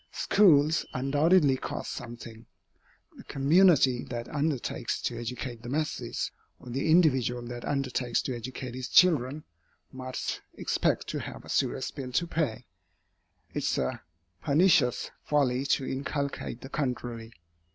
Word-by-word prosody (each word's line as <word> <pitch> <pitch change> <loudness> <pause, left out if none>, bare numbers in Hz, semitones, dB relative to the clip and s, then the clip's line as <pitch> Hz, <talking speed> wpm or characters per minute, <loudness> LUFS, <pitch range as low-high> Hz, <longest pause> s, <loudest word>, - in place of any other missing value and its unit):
Schools 160 -6 +4
undoubtedly 145 +2 +3
cost - - -5
something. 115 -1 -9 0.7
The - - -11
community 140 -3 +4
that 120 -2 -5
undertakes 145 -3 -2
to 120 - -1
educate 120 0 -5
the 120 - -8
masses, 150 +3 -2 0.3
or 125 - -10
the 135 +6 -1
individual 130 -8 +3
that 120 0 -7
undertakes 130 -4 -1
to 130 - -3
educate 125 +1 -6
his 130 0 -5
children, 150 -4 +4 0.5
must 130 -1 -4
expect - - 0
to - - -2
have - - -8
a - - -13
serious - - 0
bill 130 -2 -6
to 170 - +2
pay. 140 -8 -2 0.9
It - - -1
is - - 0
a 65 - -2 0.4
pernicious 150 -4 +3
folly 135 -2 +1
to 135 - +1
inculcate 140 -2 -3
the 135 - -9
contrary. 120 -5 -3
130 Hz, 130 wpm, -28 LUFS, 120-150 Hz, 0.9 s, Schools